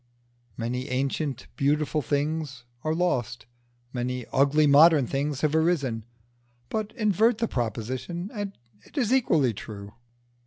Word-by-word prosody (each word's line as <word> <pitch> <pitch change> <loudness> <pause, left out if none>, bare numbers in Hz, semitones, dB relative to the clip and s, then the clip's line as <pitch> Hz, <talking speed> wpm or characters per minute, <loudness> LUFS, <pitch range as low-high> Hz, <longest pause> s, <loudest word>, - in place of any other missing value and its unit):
Many 125 +3 -3
ancient 135 +1 -2
beautiful 150 +2 +1
things 145 -1 -2 0.2
are 155 0 0
lost, 125 -10 -1 0.5
many 125 -1 -2
ugly 140 +3 +4
modern 145 0 +7
things 140 +1 -2
have 155 -1 +1
arisen; 140 -9 +1 0.6
but 215 -1 -2
invert 215 +2 +3
the 230 0 0
proposition 130 - -3
and 205 -3 -5 0.3
it - - -18
is 250 -3 +2
equally 155 - +3
true. 100 0 -9
145 Hz, 120 wpm, -26 LUFS, 125-170 Hz, 0.6 s, modern